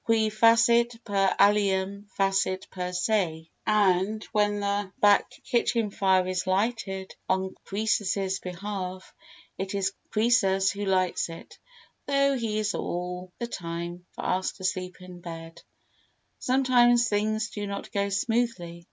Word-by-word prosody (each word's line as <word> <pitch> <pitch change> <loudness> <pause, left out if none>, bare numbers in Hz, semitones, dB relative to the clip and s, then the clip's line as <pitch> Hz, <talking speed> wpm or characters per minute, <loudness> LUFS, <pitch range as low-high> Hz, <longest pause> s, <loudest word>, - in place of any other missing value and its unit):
Qui 220 -1 +3
facit 230 +2 +4
per 195 -2 +1
alium 200 0 +2
facit 195 -1 +1
per 180 -1 -4
se, 180 -4 -1 0.2
and 210 0 +2
when 205 -1 +1
the 200 -1 -1
back 205 -1 +5
kitchen 230 -3 +1
fire 190 -2 +2
is 185 0 -2
lighted 195 -1 -1 0.2
on 190 0 0
Croesus's 195 -2 0
behalf, 185 0 -6 0.5
it 195 +1 -3
is 195 0 0 0.2
Croesus 205 -4 +3
who 205 0 -4
lights 185 -3 +1
it, 165 - -11 0.5
though 275 0 +3
he 225 -4 -2
is 210 -1 0
all 180 +1 -4
the 235 - -3
time 170 -4 -5
fast 185 +2 -2
asleep 185 -1 -3
in 180 -1 -11
bed. 165 -1 -9 0.8
Sometimes 245 -2 +4
things 215 +1 0
do 205 -1 -4
not 200 0 -6
go 200 0 0
smoothly. 195 -4 -1
195 Hz, 125 wpm, -27 LUFS, 185-215 Hz, 0.8 s, back